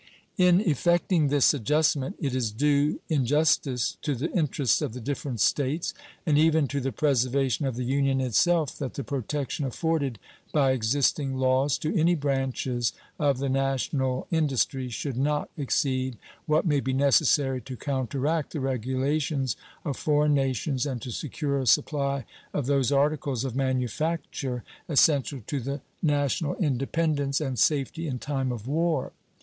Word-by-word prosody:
In 180 +1 +5
effecting 170 - +2
this 140 0 +4
adjustment 150 - +1
it 140 -6 -2
is 125 -4 0
due, 145 +5 +1
in 150 -5 +1
justice 135 -3 +1
to 145 -3 -1
the 145 +8 -3
interests 145 - +1
of 140 -7 -2
the 125 - -6
different 135 -1 -4
States, 145 - +1 0.3
and 150 -2 +3
even 160 -2 +4
to 140 - -1
the 135 +1 -1
preservation 135 +1 +1
of 130 - -3
the 125 - -3
Union 135 +1 +1
itself, 150 - +2
that 135 -3 -4
the 140 - -3
protection 140 +2 -3
afforded 140 -2 -1 0.3
by 140 -3 +3
existing 135 +3 +1
laws 130 +2 +2
to 155 +6 -2
any 175 0 +3
branches 135 -4 -1 0.3
of 140 -3 +2
the 140 +1 -2
national 135 -1 0
industry 135 - 0
should 125 +2 -4
not 150 +2 0
exceed 130 -3 -1 0.3
what 155 +3 +2
may 145 -4 +2
be 130 -1 -2
necessary 135 -1 +3
to 130 0 -8
counteract 140 +4 -1
the 155 - -2
regulations 135 +1 -1 0.3
of 140 -4 -2
foreign 150 0 +2
nations 135 0 0
and 130 -3 -3
to 125 - -5
secure 140 +2 -2
a 130 - -3
supply 140 -3 +1 0.3
of 145 - 0
those 140 -1 +2
articles 140 -3 +1
of 130 -2 -4
manufacture 130 0 -2 0.3
essential 140 -2 +3
to 145 - -2
the 140 +3 -4 0.2
national 145 -1 +1
independence 145 -1 0
and 135 -6 -3
safety 155 +4 +1
in 130 -4 -2
time 135 -1 -2
of 115 -3 -6
war. 160 -1 0
140 Hz, 150 wpm, -27 LUFS, 130-150 Hz, 0.3 s, In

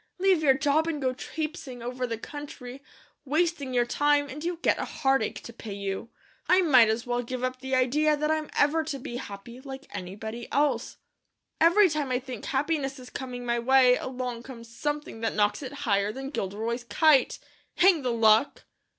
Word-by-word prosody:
Leave 375 -3 +3
your 275 -4 +5
job 295 +4 +2
and 320 -3 -2
go 260 -2 0
trapesing 285 -3 -6
over 250 +1 -3
the 230 -1 -3
country, 275 -1 -9 0.4
wasting 305 -1 0
your 245 -1 +2
time, 290 +3 +2
and 295 +4 -7
you 345 0 -2
get - - +2
a - - -1
heartache 270 -5 0
to 235 - -9
pay 220 -3 -8
you. 200 +2 -4 0.4
I 370 +1 +6
might 255 -9 +6
as 220 +2 -1
well 245 0 -1
give 250 +1 -5
up 255 0 -2
the 265 0 -2
idea 295 +4 +2
that 300 +1 0
I'm 310 -1 -1
ever 315 +3 +3
to 310 -3 -4
be 245 -2 -6
happy, 235 +1 -9
like 270 0 -8
anybody 220 +6 -6
else. 275 -4 0 0.6
Every 345 +5 +6
time 300 -4 -2
I 250 - +1
think 255 -3 -7
happiness 275 -1 -1
is 250 -1 -12
coming 250 -2 -6
my 235 0 0
way, 255 +1 +5
along 250 -2 -4
comes 230 -2 -11
something 295 -6 -4
that 225 - -1
knocks 205 +2 +1
it 265 -2 -6
higher 200 -2 +2
than 270 +4 -6
Gilderoy's 225 +2 -3
kite. 310 -1 +3 0.4
Hang 355 -4 +5
the 250 -2 -1
luck!" 225 +2 +3
260 Hz, 185 wpm, -27 LUFS, 235-295 Hz, 0.6 s, I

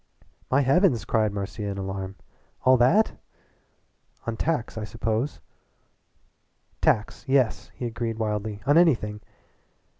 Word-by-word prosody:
"My 135 +2 +4
heavens!" 135 - +3
cried 110 -1 +1
Marcia 100 +1 -5
in 100 -1 -3
alarm. 95 0 -4 0.5
"All 130 0 +6
that? 130 - +4 1.1
On 115 - -2
tacks, 150 -1 -1
I 110 - -4
suppose." 115 +5 -2 1.4
"Tacks 105 -1 +1
yes," 125 -7 +1
he 125 - -5
agreed 115 -1 -3
wildly 105 -1 -2
"on 145 +4 +5
anything. 110 -11 +2
115 Hz, 115 wpm, -26 LUFS, 105-130 Hz, 1.4 s, All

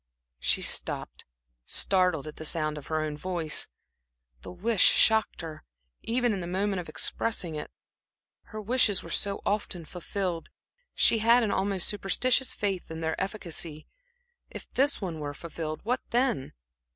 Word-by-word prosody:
She - - +1
stopped, - - +1 0.4
startled 180 -6 +2
at 155 - -8
the - - -6
sound 155 -1 -1
of 145 - -13
her 155 -1 0
own 155 -1 -2
voice. 165 -1 -2 0.7
The - - -8
wish 200 +3 0
shocked 220 -4 +4
her, 160 -2 -8 0.4
even 240 0 +1
in 195 - -2
the 175 - -4
moment 195 +2 0
of 170 - -7
expressing 180 +1 0
it. 150 -1 -5 0.8
Her 215 -1 -8
wishes 215 -2 +2
were - - -8
so 200 -1 +1
often 200 -5 -1
fulfilled 180 0 -3 0.5
she 225 - +4
had 235 +2 +5
an 210 - +1
almost 190 -1 0
superstitious 250 +6 +1
faith 195 -3 -2
in 160 0 -6
their 160 0 0
efficacy. 170 -6 -4 0.6
If - - -9
this 280 0 +3
one 170 -5 -4
were 145 -1 -4
fulfilled, 155 0 -5
what 250 +3 0
then? 240 - +1
185 Hz, 150 wpm, -28 LUFS, 160-215 Hz, 0.8 s, had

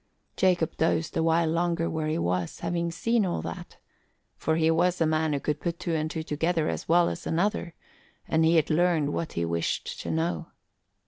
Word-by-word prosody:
Jacob 180 -4 +2
dozed 160 0 0
a 165 - +2
while 165 0 +3
longer 170 +1 0
where 155 -1 -2
he 155 +1 0
was, 90 - -2
having 170 0 -1
seen 230 +6 +1
all 180 - -1
that; - - -7 0.6
for 160 - 0
he 160 0 +3
was 180 +2 +2
a 165 - +3
man 155 0 +1
who 145 - 0
could 150 +1 -2
put 170 0 -3
two 170 - -2
and 155 -1 0
two 160 0 -4
together 160 +1 0
as - - -4
well 170 +1 +5
as 170 - -4
another, 175 0 -1 0.5
and 160 0 +2
he 165 +1 +4
had 160 -1 +3
learned 160 -3 +2
what 165 - -3
he 85 - -1
wished 85 0 -2
to 85 - -5
know. 80 0 -1
160 Hz, 200 wpm, -27 LUFS, 155-170 Hz, 0.6 s, well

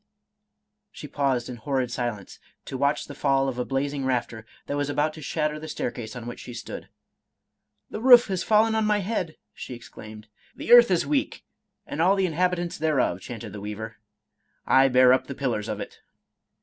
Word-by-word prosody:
" - - -55 0.3
She - - -9
paused 135 -4 -1
in 125 -1 -7
horrid 130 +1 -2
silence, 120 -5 -4 0.3
to - - -7
watch 140 +2 0
the 145 - -9
fall 135 -1 +1
of 125 -2 -3
a 125 - -1
blazing 140 +1 -2
rafter 120 -4 -2 0.2
that 145 - -3
was 145 0 -1
about 150 +2 0
to 155 - -11
shatter 150 +1 -2
the 155 - -8
staircase 120 -6 -5
on 120 -2 -7
which 120 - -7
she 120 - -9
stood. 120 - -8 0.3
— - - -57
" - - -54
The 215 - -5
roof 245 -1 +8
has 190 -3 -2
fallen 220 +1 +3
on 220 0 +1
my 210 -1 +2
head! 185 -5 -3
" - - -55
she 125 - -8
exclaimed. 110 -2 -12
" - - -32
The - - -5
earth 240 -2 +9
is 180 -3 +2
weak, 285 -2 -1 0.4
and 155 - -4
all 185 +4 +4
the 195 -1 +1
inhabitants 175 0 -1
thereof," 140 - +1
chanted 120 -4 -8
the 105 - -7
weaver; 105 +2 -6 0.4
" - - -50 0.2
I 135 +1 +5
bear 130 -1 +6
up 130 - 0
the 140 - -6
pillars 125 -6 -2
of - - -4
it." - - -8
140 Hz, 210 wpm, -25 LUFS, 120-170 Hz, 0.4 s, earth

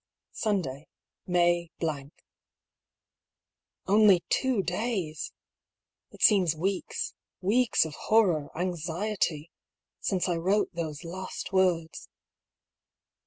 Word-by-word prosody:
Sunday, 160 -10 -2 0.4
May 175 -1 +2
—. - - -36 2.0
Only 200 -3 +5
two 255 -7 +1
days 180 -5 -2
I - - -47 0.8
It - - -5
seems 185 -7 +5
weeks 185 +4 -2
— - - -64
weeks 225 +2 +3
of 160 - -6 0.2
horror, 180 -10 +3
anxiety 170 -1 -2 0.2
— - - -64
since 190 -1 0
I 175 -2 0
wrote 190 +6 +1
those 160 -2 -4
last 185 +3 -6
words. 175 -4 +1
180 Hz, 100 wpm, -28 LUFS, 165-200 Hz, 2.0 s, Only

